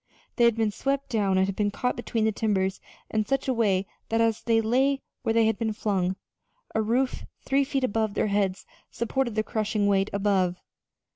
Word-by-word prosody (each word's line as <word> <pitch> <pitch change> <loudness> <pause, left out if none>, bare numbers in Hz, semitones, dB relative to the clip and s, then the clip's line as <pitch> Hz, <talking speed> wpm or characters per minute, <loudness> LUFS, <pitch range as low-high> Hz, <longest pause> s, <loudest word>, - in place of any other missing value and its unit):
They 240 - +4
had 235 -2 +4
been 220 -2 +1
swept 275 +5 -2
down 200 -5 +1
and 190 - +4
had 195 0 -3
been 205 0 +1
caught 250 +4 -1
between 230 -2 -1
the 220 - +3
timbers 195 -3 0 0.3
in 215 -1 +1
such 270 0 0
a 260 - +2
way 200 -5 +2 0.2
that 225 - +1
as 225 -1 +2
they 230 -2 +2
lay 265 +5 +1 0.2
where 225 - 0
they 225 0 +4
had 220 -1 +1
been 220 -2 0
flung, 190 -4 0 0.6
a 220 - +1
roof 245 +4 0 0.2
three 275 +1 +3
feet 270 -1 -2
above 220 -3 0
their - - +1
heads 200 -2 0 0.2
supported 235 0 -2
the 215 - +1
crushing 215 -1 -1
weight 195 0 +2
above. 195 -3 +1
220 Hz, 200 wpm, -26 LUFS, 200-235 Hz, 0.6 s, They